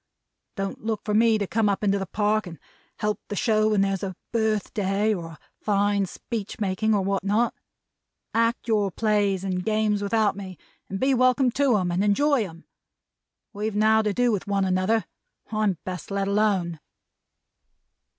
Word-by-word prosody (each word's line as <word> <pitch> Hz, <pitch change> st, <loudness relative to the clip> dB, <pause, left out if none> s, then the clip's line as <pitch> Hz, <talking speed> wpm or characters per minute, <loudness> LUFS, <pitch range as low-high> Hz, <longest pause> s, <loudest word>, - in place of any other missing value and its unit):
Don't 195 Hz, 0 st, -4 dB
look 220 Hz, -1 st, -2 dB
for 210 Hz, -, -1 dB
me 225 Hz, +1 st, +4 dB
to 205 Hz, -, -1 dB
come 215 Hz, +2 st, +1 dB
up 200 Hz, +1 st, -1 dB
into 200 Hz, -1 st, +2 dB
the 195 Hz, -, -4 dB
Park 210 Hz, +2 st, 0 dB
to 170 Hz, -2 st, -9 dB, 0.4 s
help 210 Hz, 0 st, -1 dB
the 205 Hz, -, -4 dB
show 215 Hz, 0 st, +2 dB
when 210 Hz, -2 st, +2 dB
there's 195 Hz, -1 st, 0 dB
a 190 Hz, -2 st, -4 dB, 0.2 s
Birthday, 215 Hz, -2 st, 0 dB
or 175 Hz, -5 st, -4 dB
a -, -, -16 dB, 0.2 s
fine 205 Hz, -1 st, +1 dB
Speechmaking, 215 Hz, 0 st, -2 dB
or 200 Hz, -, +1 dB
what 195 Hz, 0 st, -1 dB
not. 215 Hz, +4 st, +1 dB, 0.8 s
Act 230 Hz, +2 st, +1 dB
your 210 Hz, -3 st, +2 dB
Plays 205 Hz, -1 st, +1 dB
and 185 Hz, -2 st, -2 dB
Games 215 Hz, -1 st, +1 dB
without 210 Hz, 0 st, +1 dB
me, 190 Hz, -3 st, -8 dB, 0.3 s
and 195 Hz, -, -4 dB
be 270 Hz, +1 st, +2 dB
welcome 255 Hz, 0 st, +3 dB
to 270 Hz, -3 st, +2 dB
'em 180 Hz, -3 st, -1 dB
and 180 Hz, +3 st, +1 dB
enjoy 270 Hz, +5 st, +3 dB
'em. 165 Hz, +1 st, -15 dB, 0.9 s
We've 210 Hz, 0 st, -3 dB
now 220 Hz, +1 st, +4 dB
to 215 Hz, -1 st, 0 dB
do 245 Hz, +3 st, +2 dB
with 205 Hz, -3 st, -2 dB
one 200 Hz, -1 st, +1 dB
another. 185 Hz, +4 st, +1 dB, 0.5 s
I'm 215 Hz, -4 st, +1 dB
best 180 Hz, -3 st, -6 dB
let 195 Hz, -1 st, -1 dB
alone!'" 200 Hz, -5 st, +1 dB
205 Hz, 170 wpm, -25 LUFS, 195-220 Hz, 0.9 s, me